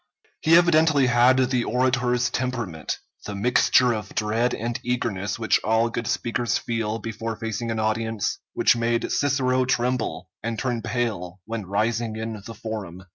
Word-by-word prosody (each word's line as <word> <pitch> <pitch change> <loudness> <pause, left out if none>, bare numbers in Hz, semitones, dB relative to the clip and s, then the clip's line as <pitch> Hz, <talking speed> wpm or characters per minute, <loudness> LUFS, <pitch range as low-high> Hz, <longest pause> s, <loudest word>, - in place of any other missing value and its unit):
He 160 +1 +5
evidently 160 -5 +4
had 125 +1 +5
the 125 -1 +2
orator's 125 0 +1
temperament 120 -11 -3 0.3
the 100 - -4
mixture 125 +3 +4
of 110 -1 -6
dread 110 +3 +1
and 120 +1 -3
eagerness 105 -5 -2
which 110 -1 +2
all 115 +2 +2
good 115 -1 -3
speakers 120 0 0
feel 115 -2 -2
before 115 0 -5
facing 115 +1 -4
an 115 - -1
audience, 110 0 -1
which - - +4
made 115 0 0
Cicero 130 -2 +2
tremble 125 -6 -1
and 115 0 -3
turn 120 -1 -1
pale 105 -7 -3
when 110 -3 -5
rising 110 +3 0
in 110 -1 -5
the 115 - -8
Forum. 100 -5 -6
115 Hz, 150 wpm, -24 LUFS, 110-125 Hz, 0.3 s, He